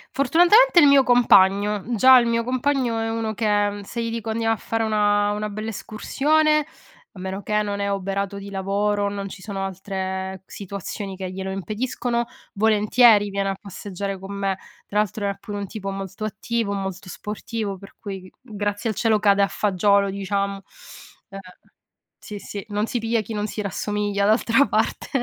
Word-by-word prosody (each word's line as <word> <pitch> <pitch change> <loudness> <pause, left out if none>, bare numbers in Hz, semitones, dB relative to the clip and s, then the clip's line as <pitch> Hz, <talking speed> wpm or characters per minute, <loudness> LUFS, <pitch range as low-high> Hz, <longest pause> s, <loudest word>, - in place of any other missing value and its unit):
Fortunatamente, 350 - +5
il 315 - +7
mio 280 -1 +7
compagno. 205 -5 +4
Già 260 +3 +8
il 240 - +1
mio 230 0 +1
compagno 255 -1 0
è 225 0 -1
uno 225 -1 -2
che 205 -2 0
se 235 +4 -4
gli 230 - -3
dico 230 -1 -4
andiamo 225 0 +1
a - - -3
fare 225 +2 -2
una 205 -1 +2
una 210 +1 -3
bella 215 +2 -5
escursione, 305 +8 +1 0.5
a 190 - -12
meno 190 +2 -4
che 210 +1 0
non 200 -1 -3
è 200 0 -1
oberato 195 0 -2
di 200 0 -8
lavoro, 200 +1 0
non 200 -1 -5
ci 190 - -10
sono 195 -1 -4
altre 190 0 -4
situazioni 200 0 -6
che 185 -1 -5
glielo 190 +1 -5
impediscono, 235 +4 -2 0.3
volentieri, 215 0 +4
viene 195 0 -1
a 195 - -2
passeggiare 195 0 -6
con 195 +1 -7
me. 195 -1 -1 0.3
Tra 210 - -1
l'altro 210 0 -1
è 200 - -2
pure 205 0 -6
un 200 - -3
tipo 195 0 -6
molto 195 +1 -5
attivo, 225 0 -2
molto 190 -1 -5
sportivo, 210 0 -5
per 195 - -14
cui, 195 -2 -6
g 185 - -14
grazie 205 -1 -3
al - - -7
cielo, 220 +1 +2
cade 200 -1 +3
a 200 - +4
fagiolo, 200 0 +2
diciamo. 200 0 -2 0.7
Uhm, 195 - -8 0.8
sì, 210 - -8
sì, 200 0 -7
non 210 +1 0
si 240 - -2
piglia 225 0 0
chi 215 +2 -7
non 210 0 -2
si 215 - -4
rassomiglia, 205 0 -1
d'altra 230 +5 +3
parte. - - -1
205 Hz, 180 wpm, -23 LUFS, 195-225 Hz, 0.8 s, Già